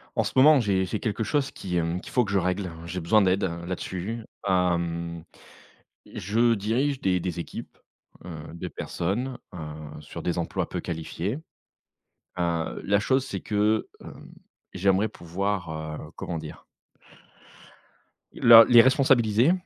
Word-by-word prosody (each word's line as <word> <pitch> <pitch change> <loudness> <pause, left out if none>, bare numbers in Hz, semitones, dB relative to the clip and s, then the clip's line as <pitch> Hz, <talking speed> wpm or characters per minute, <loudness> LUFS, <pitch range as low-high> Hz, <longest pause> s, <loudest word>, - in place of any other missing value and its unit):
En - - +2
ce - - -4
moment, 145 +2 +7
j'ai 100 -5 +1
j'ai 100 +3 -3
quelque 115 0 -2
chose 140 +6 0
qui, 90 -2 -4
hem, 85 +1 -1
qu'il - - -11
faut 125 -2 +2
que 95 - -5
je 100 - +2
règle. 90 0 -1
J'ai 90 +2 -4
besoin 100 +6 +3
d'aide, 95 0 +2
heu, 85 -1 -3
là-dessus. 95 +5 -4 0.2
Hem, 85 -2 0 0.9
je 115 +3 +2
dirige 125 +7 0
des 90 -1 +1
des 90 -1 -3
équipes, - - -8 0.5
heu, - - -8 0.2
de 90 +2 -5
personnes, 115 +11 -3 0.2
heu, - - -7 0.4
sur - - -9
des 90 0 -1
emplois 85 - -2
peu - - -4
qualifiés. 85 - -4 1.0
Heu, 85 -2 -1
la 100 +1 +3
chose, 130 +5 +1
c'est 100 -8 -5
que, 105 +1 +1
hem, - - -12 0.4
j'aimerais 95 +3 +2
pouvoir, 90 +1 -3 0.3
heu, 75 - -10
comment 85 - -5
dire? 80 -1 -9 1.7
Le 115 -1 +9
les 120 -1 +8
responsabiliser, 130 -1 +4
95 Hz, 145 wpm, -26 LUFS, 85-115 Hz, 1.7 s, Le